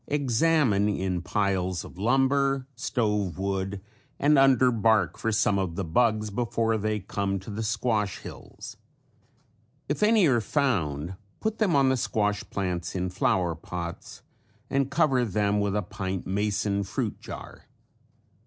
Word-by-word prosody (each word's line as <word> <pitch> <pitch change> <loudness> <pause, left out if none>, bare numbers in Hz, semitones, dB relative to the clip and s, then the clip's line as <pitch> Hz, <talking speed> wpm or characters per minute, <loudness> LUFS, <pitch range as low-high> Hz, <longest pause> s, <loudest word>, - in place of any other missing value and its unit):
Examine 135 -6 +2
in 95 -3 -1
piles 95 0 -1
of - - -12
lumber, 135 +3 +2
stove 105 -7 -1
wood 95 0 -2 0.4
and 150 +2 +4
under 130 -2 +5
bark 110 -4 +2
for 115 - -2
some 105 -2 +2
of 90 -4 -2
the 100 - -2
bugs 110 +4 +1
before 115 0 0
they 105 +1 -1
come 100 0 -2
to 95 +3 -8
the 105 +2 -4
squash 110 -2 0
hills. - - -10 1.1
If 145 - -2
any 210 -2 +5
are 125 -6 +3
found 95 - -1 0.2
put 220 0 -2
them 195 -8 +2
on 135 -1 +4
the 130 - +2
squash 105 -3 0
plants 90 -3 -3
in 90 0 -2
flower 90 -1 +1
pots 85 +1 -7 0.5
and 135 -1 +1
cover 140 -6 +2
them 105 -1 +1
with 100 0 0
a 105 - 0
pint 95 0 -4
mason 100 +1 0
fruit 100 -1 -3
jar. - - -10
105 Hz, 145 wpm, -27 LUFS, 95-125 Hz, 1.1 s, under